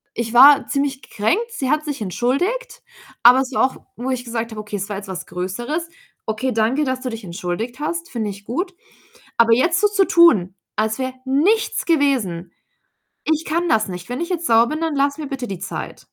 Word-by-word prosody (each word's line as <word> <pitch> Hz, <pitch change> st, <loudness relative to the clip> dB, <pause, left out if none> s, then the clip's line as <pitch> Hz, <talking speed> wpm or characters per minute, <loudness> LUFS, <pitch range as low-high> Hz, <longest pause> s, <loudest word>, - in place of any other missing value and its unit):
ich 230 Hz, -1 st, -3 dB
war 275 Hz, +3 st, +8 dB
ziemlich 275 Hz, -1 st, -1 dB
gekränkt, 390 Hz, -, -1 dB
sie 265 Hz, -, -3 dB
hat 305 Hz, 0 st, +1 dB
sich 285 Hz, -6 st, -4 dB
entschuldigt, 355 Hz, -, -1 dB, 0.4 s
aber 250 Hz, +2 st, +8 dB
es 270 Hz, 0 st, -4 dB
war -, -, +3 dB
auch, 260 Hz, -, -3 dB, 0.2 s
wo 250 Hz, +3 st, -4 dB
ich 250 Hz, -1 st, -3 dB
gesagt 230 Hz, -1 st, -3 dB
habe 215 Hz, -, -6 dB
okay, 210 Hz, 0 st, -7 dB
es 195 Hz, +2 st, -5 dB
war 205 Hz, -, -3 dB
jetzt 200 Hz, 0 st, -8 dB
was 190 Hz, -2 st, -6 dB
Größeres. 240 Hz, -, -4 dB, 0.4 s
„Okay, 235 Hz, +4 st, -1 dB
danke, 225 Hz, +7 st, +1 dB
dass 260 Hz, 0 st, -2 dB
du 255 Hz, -, -3 dB
dich 225 Hz, -2 st, -7 dB
entschuldigt 190 Hz, +8 st, -4 dB
hast, 335 Hz, +3 st, -3 dB
finde 220 Hz, -4 st, -3 dB
ich 200 Hz, +1 st, -11 dB
gut. 360 Hz, -, -3 dB, 0.6 s
Aber 230 Hz, -1 st, +5 dB
jetzt 335 Hz, +9 st, +2 dB
so 415 Hz, -, +4 dB
zu 395 Hz, -2 st, +2 dB
tun, 210 Hz, -, +5 dB, 0.2 s
als 220 Hz, +2 st, 0 dB
wär 260 Hz, 0 st, -2 dB
nichts 335 Hz, +13 st, +1 dB
gewesen 250 Hz, -, +1 dB, 0.7 s
ich 315 Hz, +1 st, 0 dB
kann 340 Hz, +2 st, 0 dB
das 220 Hz, -9 st, +2 dB
nicht. 180 Hz, +2 st, -7 dB
Wenn 250 Hz, -, -3 dB
ich 340 Hz, -, -2 dB
jetzt 345 Hz, -2 st, -2 dB
sauer 230 Hz, 0 st, +5 dB
bin, 310 Hz, +2 st, -3 dB
dann 320 Hz, -3 st, -1 dB
lass 280 Hz, +1 st, +1 dB
mir 300 Hz, -2 st, -5 dB
bitte 270 Hz, -3 st, -5 dB
die 190 Hz, -5 st, -5 dB
Zeit.“ -, -, -6 dB
260 Hz, 210 wpm, -20 LUFS, 220-310 Hz, 0.7 s, war